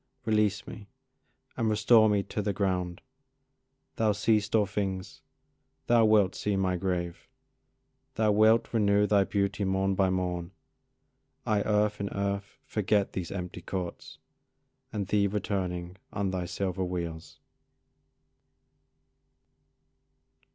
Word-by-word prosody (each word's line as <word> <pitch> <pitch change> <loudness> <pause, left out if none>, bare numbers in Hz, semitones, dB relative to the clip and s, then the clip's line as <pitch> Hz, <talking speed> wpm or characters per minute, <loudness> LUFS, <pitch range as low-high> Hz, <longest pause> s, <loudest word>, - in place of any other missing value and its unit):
Release 105 -2 +1
me, 105 -3 -10 0.7
and 115 -1 0
restore 110 +1 +5
me 100 -1 +2
to 105 - -4
the 100 0 -1
ground; 90 -2 -1 1.0
Thou 110 -2 +2
seest 105 0 +1
all 105 -2 +4
things, 95 -1 -4 0.6
thou 120 -1 +4
wilt 105 -4 +4
see 105 -1 -1
my 95 -1 +1
grave: 85 -1 -3 0.9
Thou 110 -1 +2
wilt 110 +3 +4
renew 105 -2 +3
thy 100 -2 +3
beauty 100 +1 -1
morn 95 0 +1
by 95 0 +2
morn; 90 -1 -2 0.9
I 105 -1 +2
earth 105 0 +1
in 100 0 -2
earth 100 0 -3
forget 105 -1 0
these 90 -3 -4
empty 90 -2 -5
courts, 90 0 -6 0.7
And 105 -2 -2
thee 100 +1 +2
returning 95 -3 -3
on 100 -2 -1
thy 90 -1 -2
silver 95 +1 -2
wheels. 85 -3 -5
100 Hz, 115 wpm, -29 LUFS, 95-105 Hz, 1.0 s, restore